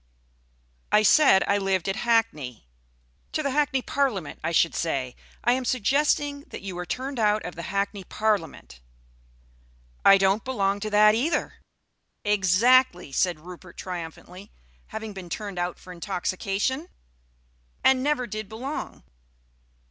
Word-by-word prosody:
"I 210 0 +5
said 215 -3 +6
I 200 0 +2
lived 195 -2 0
at 195 +2 -1
Hackney." 225 - 0 0.7
"To 310 - -1
the 280 - 0
Hackney 270 -2 +1
Parliament, 245 - -1
I - - -1
should 165 0 +3
say. 135 -6 -2 0.3
I 240 - +4
am 260 +1 -1
suggesting 285 +4 +1
that - - -9
you 190 -2 -5
were 180 0 -5
turned 265 0 -4
out 210 -1 +2
of 180 - -5
the 170 - -7
Hackney 200 0 -2
Parliament 185 - -2 0.6
" - - -33 0.5
"I 195 - +8
don't 195 +2 +2
belong 200 -6 0
to 215 +1 -3
that 210 0 +6
either." 265 +10 -1 0.7
"Exactly!" 205 - +3
said 170 +2 0
Rupert 180 +1 -12
triumphantly. 180 +2 -8 0.4
"Having 220 -1 -6
been 185 -3 -9
turned 200 -1 -5
out 175 0 -2
for 180 - -11
intoxication?" 195 - -2 0.9
"And 265 -1 +4
never 280 -2 0
did 215 -3 -6
belong." 255 +7 -6
205 Hz, 140 wpm, -25 LUFS, 180-250 Hz, 0.9 s, I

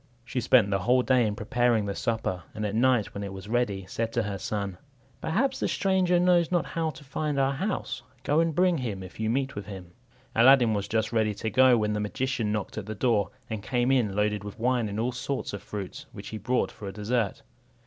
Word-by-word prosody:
She 125 +1 -2
spent 115 -3 +4
the 95 - +2
whole 125 +6 +3
day 125 -3 +3
in 105 - -2
preparing 120 -1 +1
the 100 - -2
supper; 110 -5 -2
and 105 -1 -2
at 100 - -2
night, 120 -1 +2
when 100 - -5
it 100 - -5
was 95 +1 -8
ready, 105 -5 0
said 115 +4 -3
to 115 - +1
her 100 -2 -4
son, 100 -2 -3 0.4
"Perhaps 260 +11 0
the - - 0
stranger 185 -2 +2
knows 175 -1 +4
not 175 -2 +2
how 165 -1 -2
to 150 - -10
find 145 +1 -2
our 135 0 +2
house; 145 - -3 0.2
go 150 +2 +2
and 165 -2 +1
bring 180 -2 +3
him, 105 -7 -4
if 95 - -12
you 110 0 0
meet 135 +3 0
with 100 -1 -7
him." 95 -4 -9 0.4
Aladdin 120 -1 +6
was 100 -1 -2
just 110 +1 0
ready 110 -2 +1
to 110 +2 -3
go, 130 +2 +6
when 105 -1 0
the 105 - -1
magician 115 +1 -1
knocked 105 0 -3
at 105 - -8
the 110 - -4
door, 110 -3 +2 0.2
and 110 -2 -4
came 125 +3 +1
in 115 -7 +2
loaded 105 0 0
with 105 0 -8
wine 120 -2 +1
and 100 +2 -4
all 120 +3 0
sorts 130 +1 -3
of 100 - -5
fruits, 100 -3 -7
which - - -8
he 110 - -5
brought 125 +5 0
for 105 - -9
a - - -4
dessert. 105 +1 -1
115 Hz, 230 wpm, -27 LUFS, 105-130 Hz, 0.4 s, Aladdin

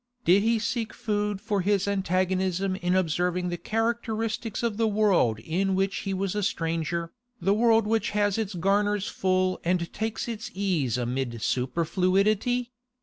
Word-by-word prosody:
Did 185 +4 +5
he 225 +2 +2
seek 225 +1 -2
food 210 -3 -1
for 200 -1 -1
his 200 +1 +1
antagonism 185 -1 0
in 180 -1 0
observing 180 0 0
the 175 - -3
characteristics 225 +1 -2
of 225 -3 -1
the 225 0 +2
world 200 - +3
in 185 - -1
which 195 +1 0
he 195 - -3
was 190 0 -1
a 210 - -1
stranger, 165 -3 -2 0.3
the 195 - +2
world 225 0 +4
which 220 +1 +1
has 205 0 +2
its 210 -3 -3
garners 205 +3 +1
full 185 -2 0
and 170 -1 0
takes 220 +2 -3
its 235 +1 -5
ease 170 - 0
amid 120 -2 -3
superfluity? 195 - +1
195 Hz, 150 wpm, -26 LUFS, 180-215 Hz, 0.3 s, Did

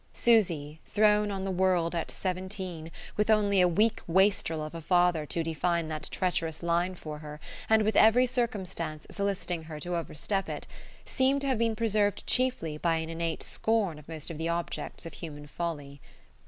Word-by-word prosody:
Susy, 170 -10 +2
thrown 210 0 +3
on 195 -1 -3
the 195 - -1
world 180 -2 +2
at 170 - -2
seventeen, 185 -3 -4 0.3
with 210 +1 +1
only 205 -3 +4
a 180 - +6
weak 215 +6 +2
wastrel 170 -3 +2
of 155 - -8
a 165 - -6
father 175 -2 +2
to 165 - -1
define 165 +1 0
that 155 -1 -4
treacherous 165 -3 -1
line 170 +2 +1
for 155 -3 -7
her, 150 0 -9 0.3
and 220 0 +5
with 215 0 +1
every 230 +3 +6
circumstance 190 -11 -2
soliciting 195 -4 -2
her 155 -1 -8
to 175 +3 -3
overstep 170 +4 -2
it, - - -5 0.4
seemed 270 +2 +2
to - - -2
have 260 -4 +1
been 230 -1 +1
preserved 210 -2 +1
chiefly 245 -12 0
by 165 0 +2
an 160 0 -3
innate 165 0 -2
scorn 210 -8 0
of 150 - -16
most 160 0 -5
of 160 - -7
the 165 +1 -1
objects 170 0 -3
of 165 - -7
human 145 -3 -8
folly. 145 -3 -5
175 Hz, 180 wpm, -29 LUFS, 160-205 Hz, 0.4 s, a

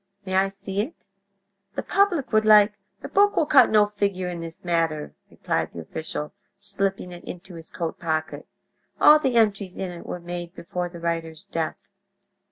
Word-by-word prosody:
May 190 - -4
I 190 +1 +4
see 195 0 -3
it? 265 +10 -7 0.7
The - - -2
public 360 - +1
would 215 0 +5
like—" 210 -1 +7 0.3
"The - - -4
book 410 +1 +3
will 320 - +3
cut 290 -2 +6
no 210 -1 +5
figure 200 -3 -2
in 175 -1 -5
this 165 +1 -9
matter," 165 -3 0 0.2
replied - - -2
the - - -7
official, 150 - -5 0.2
slipping 195 -2 -1
it 175 0 -10
into 180 +1 -9
his 165 -1 -9
coat 165 -2 -4
pocket; 155 -1 -2 0.5
"all 300 +1 +8
the 260 -5 0
entries 200 -4 +2
in 190 -2 -3
it 175 - -10
were 180 - -4
made 175 0 -6
before 175 +1 -4
the 170 -1 -10
writer's 165 -1 -3
death." 165 -5 -3
185 Hz, 175 wpm, -24 LUFS, 170-210 Hz, 0.7 s, all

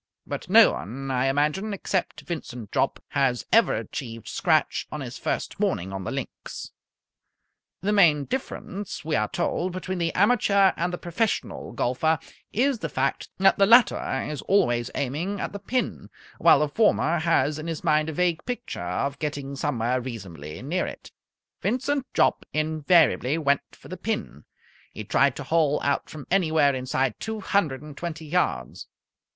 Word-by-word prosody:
But - - -6
no - - +8
one, 135 - -5
I 130 0 +1
imagine, 150 +10 0
except 190 -1 -2
Vincent 125 - -6
Jopp, - - 0
has 125 -3 +1
ever 230 0 +5
achieved 115 -5 -6
scratch - - +1
on - - -4
his - - -7
first - - -3
morning 95 +3 -1
on 95 -1 -5
the - - -2
links. - - -6 1.1
The 200 +3 0
main 155 -8 +5
difference, 205 - -5
we 155 -1 0
are - - +1
told, 180 0 -1
between 185 0 -4
the 165 -1 0
amateur 200 -2 +4
and 175 +1 -1
the 175 - -3
professional 195 +6 -2
golfer 155 +6 +1 0.3
is 260 +2 +1
the - - -3
fact 135 +1 -1
that 195 +1 +4
the 195 - +6
latter 235 +2 +4
is 150 -3 -4
always 120 -11 +2
aiming 160 +10 -2
at - - -4
the 200 - -5
pin, 250 +5 -2 0.3
while - - +7
the 150 - +2
former 170 -1 +2
has 155 -2 +1
in 155 - -6
his 165 -1 -4
mind 155 -1 +2
a - - -4
vague 175 0 0
picture 245 - -5
of 140 +11 -2
getting 145 -2 -4
somewhere 130 -3 0
reasonably 95 - -7
near 175 +7 -1
it. - - -9 0.5
Vincent 265 +2 0
Jopp - - +3
invariably 155 -2 +3
went 140 -3 +2
for - - -15
the - - -7
pin. 75 - -4 0.5
He 110 - -7
tried 130 +6 +2
to 145 - -6
hole 150 0 +2
out 140 0 0
from 150 -3 -9
anywhere 160 -6 +3
inside 130 -1 -1
two 220 -1 -4
hundred 160 -10 0
and 150 -2 -10
twenty 160 0 -5
yards. 145 - -1
155 Hz, 165 wpm, -25 LUFS, 135-185 Hz, 1.1 s, no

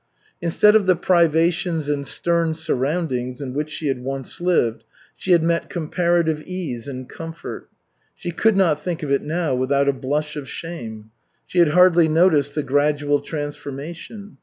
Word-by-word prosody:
Instead 190 +5 +4
of 210 -3 +3
the 185 - +5
privations 170 -1 +2
and 145 -1 -2
stern 170 -2 +1
surroundings 130 -4 -1
in 135 -3 -5
which 150 +2 -2
she 155 - -5
had 135 -3 -1
once 135 +4 -5
lived, 165 -11 +1 0.3
she 190 - -2
had 170 -2 +5
met 170 0 0
comparative 170 -1 0
ease 155 -10 -5
and 130 -2 -6
comfort. 165 0 -8 0.5
She 175 - -5
could 215 +4 +2
not 170 -6 +3
think 175 -3 -4
of 145 - -3
it 140 - +2
now 160 -1 -1
without 140 +2 +1
a 140 - +3
blush 150 +3 -2
of 145 -2 -6
shame. 110 -10 -7 0.3
She 180 - -1
had 170 -3 +6
hardly 175 0 +5
noticed 155 -3 +3
the 150 - 0
gradual 145 +1 +1
transformation. 150 +7 -7
155 Hz, 160 wpm, -21 LUFS, 140-175 Hz, 0.5 s, had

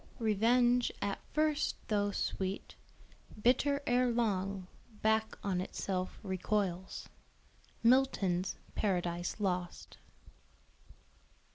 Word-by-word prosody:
"Revenge 240 +2 +3
at 200 0 -2
first 305 -1 +1
though 205 -1 +1
sweet, 190 -1 -3 0.7
Bitter 275 +5 +3
erelong, 225 -6 +1 0.4
back 220 0 +2
on 185 -3 0
itself 185 0 -3
recoils." 190 -1 -2 0.8
MILTON'S 220 -8 +3 0.2
PARADISE 175 -2 -1
LOST. 180 -3 -3
205 Hz, 75 wpm, -33 LUFS, 185-240 Hz, 0.8 s, Revenge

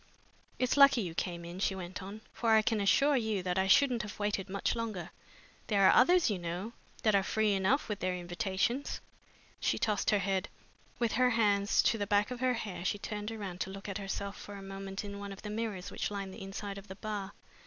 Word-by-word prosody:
It's 255 +2 +1
lucky 275 -4 +7
you 175 -5 -4
came 170 0 -3
in," 175 +2 -7
she 195 0 +1
went 185 +1 -6
on, 200 +3 -8
"for 230 -2 +2
I 220 - +5
can 220 -1 +1
assure 275 +9 +4
you 220 -6 0
that 180 0 0
I 190 - +2
shouldn't 255 +1 +5
have 210 -2 -7
waited 205 -2 -1
much 200 +1 0
longer. 215 -7 -4 0.6
There 200 -3 +4
are - - +7
others, 350 +7 +5
you 205 -5 0
know, 175 +6 -4 0.3
that 215 - +4
are 200 - +5
free 215 +1 +1
enough 195 +9 +2
with 210 -2 -3
their 185 0 -1
invitations." 190 +8 -1 0.6
She - - +1
tossed 210 -3 +1
her 210 - +4
head. 195 -1 -1 0.5
With 235 -2 +1
her 250 0 +3
hands 205 -4 +3
to 225 - +2
the 205 - -1
back 205 +2 +2
of 250 - -4
her 255 0 +2
hair 200 -6 -5
she 195 - 0
turned 210 +1 -4
round 200 -5 -6
to - - -2
look 195 +1 -8
at 200 +1 -3
herself 200 0 -4
for 205 - -9
a 195 - -8
moment 195 +1 -6
in 200 0 -6
one 200 0 -6
of 195 - -10
the 210 - -5
mirrors 210 -4 -3
which - - -2
lined 200 -2 -5
the - - -10
inside 195 +1 -5
of 200 - -15
the 190 - -8
bar. 205 -1 -5
200 Hz, 230 wpm, -32 LUFS, 190-220 Hz, 0.6 s, lucky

